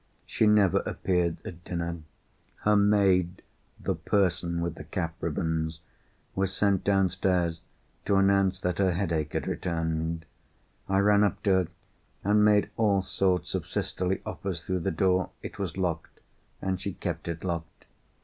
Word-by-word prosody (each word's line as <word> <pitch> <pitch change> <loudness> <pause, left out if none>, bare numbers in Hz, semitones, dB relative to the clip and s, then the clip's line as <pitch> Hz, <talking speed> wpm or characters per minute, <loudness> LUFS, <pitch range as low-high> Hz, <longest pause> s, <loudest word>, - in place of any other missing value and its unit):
She 110 - +2
never 105 -4 +5
appeared 90 -3 0
at 85 -1 -8
dinner. 85 -1 -3 0.6
Her 105 0 +4
maid 100 -3 +3 0.4
(the - - -1
person 85 -4 0
with 85 -1 -1
the 75 - -9
cap 80 +1 -3
ribbons) 80 -1 -1 0.5
was 95 0 0
sent 100 -1 +1
downstairs 95 -3 +1 0.5
to 100 - +3
announce 95 -1 +3
that 90 0 -1
her 95 -2 +3
headache 85 -5 -1
had - - -1
returned. 80 -1 -2 0.6
I 95 - +2
ran 105 0 +5
up 105 - 0
to 100 - +3
her 95 -2 +3 0.6
and 105 +1 +4
made 105 -1 +4
all 100 -4 +3
sorts 95 -2 0
of - - -2
sisterly 90 +1 -2
offers 90 -4 -4
through 95 0 -1
the 90 - -1
door. 90 +1 +2
It - - -7
was 95 -3 -3
locked, 85 -3 -3 0.4
and 95 -1 -1
she 100 0 -3
kept - - -4
it 85 0 -4
locked. 85 -3 -4
90 Hz, 150 wpm, -28 LUFS, 85-100 Hz, 0.6 s, never